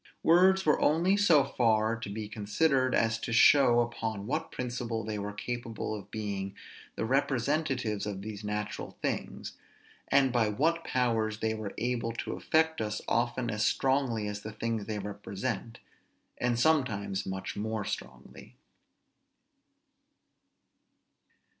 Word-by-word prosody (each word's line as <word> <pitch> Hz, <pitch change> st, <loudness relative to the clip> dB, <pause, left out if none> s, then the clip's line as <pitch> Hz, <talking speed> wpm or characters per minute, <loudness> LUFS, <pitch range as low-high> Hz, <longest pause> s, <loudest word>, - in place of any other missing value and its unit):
Words 190 Hz, +3 st, +5 dB
were 150 Hz, -, +3 dB
only 170 Hz, +6 st, +3 dB
so 175 Hz, -9 st, +5 dB
far 115 Hz, -4 st, +2 dB
to 115 Hz, -2 st, -7 dB
be 105 Hz, +1 st, -5 dB
considered 130 Hz, +6 st, +1 dB
as 115 Hz, 0 st, +2 dB
to 115 Hz, -, -4 dB
show 120 Hz, 0 st, +6 dB
upon 115 Hz, -3 st, -3 dB
what 155 Hz, +7 st, -2 dB
principle 120 Hz, -2 st, -3 dB
they 105 Hz, 0 st, -3 dB
were 100 Hz, +1 st, -4 dB
capable 115 Hz, +1 st, -4 dB
of 105 Hz, -2 st, -7 dB
being 100 Hz, -2 st, -4 dB, 0.4 s
the 110 Hz, -, -2 dB
representatives 135 Hz, -3 st, 0 dB
of 100 Hz, -2 st, -5 dB
these 105 Hz, -1 st, -7 dB
natural 105 Hz, 0 st, -4 dB
things, -, -, -3 dB, 0.5 s
and 135 Hz, -2 st, +3 dB
by 115 Hz, -3 st, +3 dB
what 165 Hz, +10 st, +1 dB
powers 115 Hz, -4 st, 0 dB
they 110 Hz, 0 st, 0 dB
were 110 Hz, -2 st, -6 dB
able 120 Hz, -1 st, -1 dB
to 115 Hz, -, -4 dB
affect 160 Hz, -3 st, +1 dB
us 105 Hz, -1 st, -3 dB
often 120 Hz, 0 st, 0 dB
as 110 Hz, 0 st, -1 dB
strongly 130 Hz, -3 st, +1 dB
as 105 Hz, 0 st, -4 dB
the 110 Hz, -, -6 dB
things 115 Hz, -1 st, -3 dB
they 110 Hz, -1 st, -2 dB
represent, 105 Hz, +3 st, -4 dB, 0.6 s
and 120 Hz, -1 st, +1 dB
sometimes 115 Hz, -10 st, +1 dB
much 95 Hz, 0 st, -4 dB
more 110 Hz, 0 st, -3 dB
strongly. 60 Hz, 0 st, -7 dB
115 Hz, 135 wpm, -30 LUFS, 105-130 Hz, 0.6 s, show